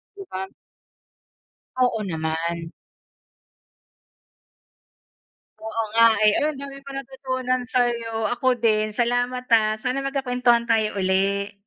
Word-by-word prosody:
'di 395 Hz, -, -8 dB
ba 190 Hz, +1 st, -4 dB, 1.3 s
Oo 245 Hz, -3 st, +2 dB
naman. 165 Hz, 0 st, -3 dB, 2.9 s
Oo 220 Hz, +1 st, -2 dB
nga, 230 Hz, 0 st, +7 dB, 0.2 s
eh. 210 Hz, -, +6 dB
Ayun, 300 Hz, -1 st, 0 dB
ang -, -, -9 dB
dami 275 Hz, 0 st, -8 dB
kong 275 Hz, 0 st, -8 dB
natutunan 260 Hz, -1 st, -2 dB
sa'yo. 235 Hz, -3 st, 0 dB
Ako 255 Hz, 0 st, +1 dB
din. 215 Hz, -2 st, +2 dB
Salamat 245 Hz, +3 st, -1 dB
ah. 215 Hz, -1 st, +4 dB
Sana 250 Hz, +4 st, -2 dB
magkakwentuhan 250 Hz, -3 st, +1 dB
tayo 220 Hz, -3 st, +1 dB
uli. 195 Hz, +2 st, 0 dB
235 Hz, 110 wpm, -23 LUFS, 215-255 Hz, 2.9 s, nga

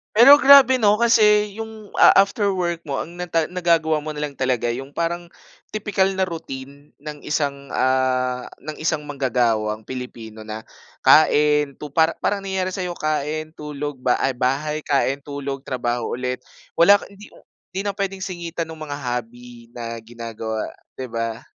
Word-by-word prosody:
Pero 275 Hz, +6 st, +9 dB
grabe 270 Hz, -2 st, +7 dB
'no 210 Hz, 0 st, +4 dB
kasi 210 Hz, -3 st, +4 dB
yung 220 Hz, -2 st, -10 dB
a -, -, +7 dB
after 200 Hz, +1 st, +3 dB
work 175 Hz, -3 st, -1 dB
mo 140 Hz, -3 st, -4 dB
ang 170 Hz, -, -13 dB
na 180 Hz, 0 st, -6 dB
ta 165 Hz, -1 st, +1 dB
nagagawa 165 Hz, -3 st, +1 dB
mo 155 Hz, -, -6 dB
nalang 150 Hz, -1 st, -4 dB
talaga 130 Hz, -3 st, -1 dB
yung 135 Hz, +3 st, -6 dB
parang 170 Hz, +3 st, -3 dB, 0.4 s
tipikal 205 Hz, -2 st, 0 dB
na 190 Hz, -, +2 dB
routine 140 Hz, -4 st, -9 dB
ng 150 Hz, 0 st, -9 dB
isang, 140 Hz, -2 st, -2 dB
ah, 130 Hz, -1 st, 0 dB
ng 155 Hz, -, -7 dB
isang 155 Hz, -2 st, -1 dB
manggagawang 115 Hz, -6 st, 0 dB
Pilipino 115 Hz, -4 st, -8 dB
na, 110 Hz, 0 st, -7 dB, 0.4 s
kain 150 Hz, -2 st, +4 dB
tu 145 Hz, -1 st, -9 dB
para 160 Hz, 0 st, +3 dB
parang 205 Hz, -1 st, -1 dB
nangyari 190 Hz, -1 st, -2 dB
sa 190 Hz, -, -3 dB, 0.2 s
kain, 155 Hz, +1 st, -2 dB
tulog, 145 Hz, -3 st, -6 dB
ba 125 Hz, -1 st, +2 dB
ay 135 Hz, -, 0 dB
bahay 140 Hz, +5 st, -1 dB
kain, 140 Hz, -1 st, 0 dB
tulog, 140 Hz, -1 st, -5 dB
trabaho 120 Hz, -3 st, -2 dB
ulit, 125 Hz, 0 st, -3 dB, 0.3 s
wala 200 Hz, +5 st, +6 dB
ka -, -, -11 dB
hindi 200 Hz, +1 st, -14 dB, 0.4 s
hindi 195 Hz, +2 st, -4 dB
na 200 Hz, -, -1 dB
pwedeng 195 Hz, -1 st, -3 dB
singitan 170 Hz, -2 st, -4 dB
nung 160 Hz, -1 st, -11 dB
mga 145 Hz, -2 st, -5 dB
hobby 120 Hz, -2 st, -6 dB
na 115 Hz, -1 st, -5 dB
ginagawa, 115 Hz, -1 st, -6 dB, 0.2 s
'di 130 Hz, -, -4 dB
ba? 115 Hz, -1 st, -4 dB
150 Hz, 160 wpm, -22 LUFS, 130-180 Hz, 0.4 s, Pero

